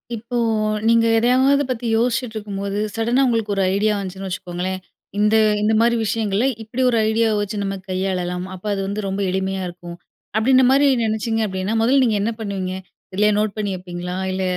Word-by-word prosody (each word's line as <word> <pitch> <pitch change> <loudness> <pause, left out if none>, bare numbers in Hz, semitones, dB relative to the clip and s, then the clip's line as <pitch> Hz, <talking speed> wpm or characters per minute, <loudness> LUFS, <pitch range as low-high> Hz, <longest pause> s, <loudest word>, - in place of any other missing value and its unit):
இப்போ 235 +3 -7 0.5
நீங்க 230 0 +4
எதையாவது 260 +4 +3
பத்தி 245 -1 -2
யோசிச்சிட்ருக்கும்போது, 215 -4 -2 0.2
சடனா 235 +4 +1
உங்களுக்கு 225 -3 0
ஒரு 195 - +1
ஐடியா 210 +2 +2
வந்துச்சுன்னு 195 0 -5
வச்சுக்கோங்களேன், 185 0 -4 0.4
"இந்த 210 +1 +3 0.3
இந்தமாரி 220 +2 +3
விஷயங்கள 215 +1 0 0.2
இப்படி 230 +4 -4
ஒரு 235 - +1
ஐடியாவ 220 0 +2
வச்சு 205 +1 -4
நம்ம 195 0 -2
கையாளலாம். 185 -1 -2
அப்ப 185 +2 -11
அது 195 - -2
வந்து 205 +2 -3
ரொம்ப 195 +1 -2
எளிமையா 190 0 -2
இருக்கும்." 175 0 -9 0.4
அப்படின்றமாரி 260 +4 +4 0.2
நினைச்சிங்க 225 +1 -1
அப்படின்னா, 190 +2 -2
முதல்ல 265 +4 +4
நீங்க 220 -3 +1
என்ன 225 +3 0
பண்ணுவீங்க? 195 -4 -3 0.4
எதுலேயோ 210 +2 +3
நோட் 210 -1 -1
பண்ணி 205 -2 -1
வப்பீங்களா? 180 0 -6 0.2
இல்ல 190 0 -2
210 Hz, 155 wpm, -21 LUFS, 190-230 Hz, 0.5 s, நீங்க